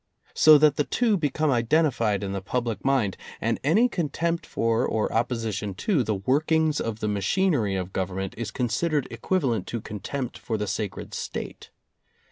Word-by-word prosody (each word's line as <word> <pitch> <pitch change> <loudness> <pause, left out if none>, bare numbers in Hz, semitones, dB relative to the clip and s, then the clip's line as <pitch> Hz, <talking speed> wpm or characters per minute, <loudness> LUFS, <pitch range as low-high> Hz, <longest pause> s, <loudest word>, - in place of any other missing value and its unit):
So 155 -1 +8
that 150 -1 +4
the 150 - +3
two 230 +6 +1
be 155 -6 0
come 155 +1 0
identified 115 - +2
in 95 - -3
the 95 -1 -3
public 115 0 -2
mind, 130 -8 +1 0.2
and 115 +1 -1
any 195 - +4
con 175 -10 -2
tempt 170 +3 -2
for 115 +1 +1
or 110 -3 -1
opposition 115 -4 -1
to 175 - +1
the 110 -2 -1
workings 155 +8 +1
of 115 -1 -4
the 105 - 0
machinery 105 - +1
of 95 0 -4
Government 95 0 -3
is 115 -2 -4
considered 135 +6 -1
equivalent 130 - -1
to 115 - -3
contempt 115 +5 -5
for 110 - -3
the 105 - -2
sacred 105 0 -4
State. - - -6
120 Hz, 170 wpm, -25 LUFS, 105-155 Hz, 0.2 s, So